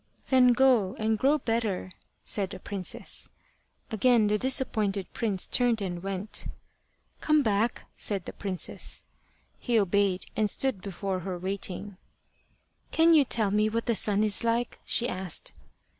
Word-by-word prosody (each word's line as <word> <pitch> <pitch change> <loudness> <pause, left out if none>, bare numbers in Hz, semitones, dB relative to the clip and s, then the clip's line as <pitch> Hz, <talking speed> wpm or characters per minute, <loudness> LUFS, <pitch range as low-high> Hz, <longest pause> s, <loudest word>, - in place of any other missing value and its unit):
"Then 250 -2 +6
go 235 -7 +3
and 220 0 0
grow 285 +3 +3
better," 225 -8 -2 0.3
said 195 -3 -1
the 190 - -8
princess. 190 -1 -5 0.6
Again 225 +1 +4
the 210 0 +1
disappointed 215 -7 +1
prince 205 -6 -1
turned 245 -3 +2
and 180 -3 -4
went. 195 +2 -4 0.7
"Come 305 -1 +3
back," 220 +1 0
said 195 -4 -2
the - - -7
princess. 190 -3 -3 0.6
He 240 -2 +1
obeyed, 200 -2 +1
and 215 -1 +1
stood 260 -4 +1
before 195 0 -3
her 180 0 -4
waiting. 190 +1 -4 0.9
"Can 330 +1 +5
you 305 -3 +7
tell 220 -5 +1
me 210 +1 +2
what 230 +1 -2
the 235 - +2
sun 210 -1 +2
is 210 0 +1
like?" 235 +1 0
she 240 - +1
asked. 185 -6 -3
210 Hz, 145 wpm, -28 LUFS, 195-235 Hz, 0.9 s, you